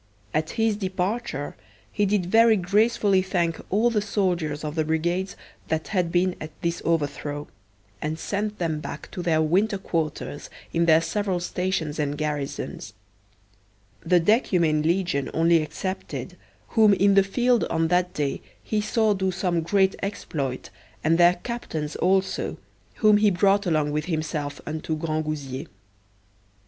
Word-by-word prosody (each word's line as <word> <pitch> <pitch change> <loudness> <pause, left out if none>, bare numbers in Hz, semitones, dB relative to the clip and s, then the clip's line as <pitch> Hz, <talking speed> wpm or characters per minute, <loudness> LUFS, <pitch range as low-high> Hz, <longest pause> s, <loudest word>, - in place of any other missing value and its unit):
At 155 +1 0
his 225 -2 +2
departure 190 - -3 0.4
he 205 -1 +1
did 195 -2 +1
very 225 +3 +5
graciously 200 +1 +3
thank 175 -3 -1
all 220 +5 +3
the 215 -2 +1
soldiers 180 -8 -1
of 150 -1 -3
the 160 -1 0
brigades 170 +4 -1 0.3
that 160 0 -2
had 180 -5 0
been 180 +1 +2
at 155 - -5
this 170 0 -1
overthrow, 145 -2 -1 0.5
and 155 +1 -2
sent 210 +4 -3
them 160 -3 -1
back 145 0 -8
to 180 - -5
their 160 -2 +2
winter 195 +6 +2
quarters 160 -5 -3 0.2
in 170 0 +2
their 160 0 +6
several 190 +2 -1
stations 175 -3 -2
and 145 -1 -1
garrisons; 150 -8 -4 1.1
the 175 +1 +4
decumane 170 - +2
legion 165 -4 0
only 165 +1 +4
excepted, 185 +4 -4 0.3
whom 215 -3 +5
in 200 +1 +4
the 195 - +7
field 240 +5 +2
on 165 0 0
that 180 0 +2
day 145 -2 -1 0.2
he 215 -1 0
saw 215 0 +2
do 190 -1 0
some 180 -2 0
great 190 +3 +2
exploit, 150 -10 -4 0.3
and 165 +2 +3
their 175 +1 +6
captains 160 -11 -4
also, 190 +1 +1 0.4
whom 215 -2 +5
he 210 0 +4
brought 200 +2 +2
along 155 -3 +1
with 150 0 -1
himself 155 -4 -3
unto 155 +1 -3
Grangousier. 155 -4 -3
175 Hz, 145 wpm, -25 LUFS, 155-200 Hz, 1.1 s, the